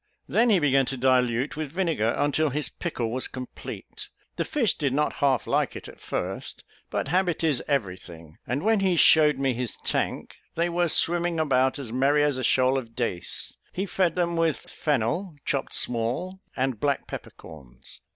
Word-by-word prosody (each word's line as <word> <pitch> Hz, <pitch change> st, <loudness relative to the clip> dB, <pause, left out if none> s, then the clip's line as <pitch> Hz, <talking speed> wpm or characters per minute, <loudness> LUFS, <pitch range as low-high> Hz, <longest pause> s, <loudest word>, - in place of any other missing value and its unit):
Then 235 Hz, +1 st, +3 dB
he 210 Hz, -, +5 dB
began 135 Hz, -5 st, +3 dB
to 135 Hz, -, -3 dB
dilute 125 Hz, +1 st, +2 dB
with 155 Hz, -2 st, -4 dB
vinegar, 165 Hz, -, +1 dB
until 145 Hz, +2 st, +2 dB
his 150 Hz, +2 st, -1 dB
pickle 120 Hz, -10 st, -3 dB
was 130 Hz, +2 st, -1 dB
complete. 130 Hz, -1 st, -8 dB, 0.3 s
The -, -, 0 dB
fish 280 Hz, -9 st, +1 dB
did 140 Hz, -4 st, -1 dB
not 150 Hz, +1 st, 0 dB
half 135 Hz, -3 st, +2 dB
like -, -, 0 dB
it -, -, -8 dB
at -, -, -13 dB
first; -, -, -4 dB, 0.3 s
but -, -, -2 dB
habit 180 Hz, 0 st, +1 dB
is 150 Hz, -6 st, +2 dB
every 110 Hz, -11 st, 0 dB
thing, 80 Hz, -3 st, -12 dB
and 130 Hz, +6 st, -1 dB
when 220 Hz, 0 st, +3 dB
he 190 Hz, -2 st, +2 dB
shewed 150 Hz, -3 st, +6 dB
me 135 Hz, -1 st, +1 dB
his 120 Hz, -1 st, -3 dB
tank, -, -, -1 dB, 0.2 s
they 170 Hz, +1 st, +1 dB
were 175 Hz, 0 st, +1 dB
swimming 170 Hz, +1 st, +2 dB
about 130 Hz, -3 st, +2 dB
as 125 Hz, -5 st, -6 dB
merry 140 Hz, +3 st, +3 dB
as 145 Hz, -3 st, +1 dB
a -, -, -3 dB
shoal 130 Hz, +1 st, +3 dB
of 115 Hz, -3 st, -11 dB
dace; 105 Hz, -8 st, -3 dB, 0.2 s
he 190 Hz, -, -2 dB
fed 185 Hz, -3 st, +1 dB
them 170 Hz, -1 st, 0 dB
with 165 Hz, -2 st, +2 dB
fennel 150 Hz, -, -2 dB
chopped 140 Hz, -1 st, -1 dB
small, 125 Hz, +11 st, -2 dB, 0.2 s
and 130 Hz, -4 st, -1 dB
black 140 Hz, +2 st, 0 dB
pepper -, -, -7 dB
corns. 65 Hz, -6 st, -14 dB
140 Hz, 180 wpm, -26 LUFS, 125-170 Hz, 0.3 s, shewed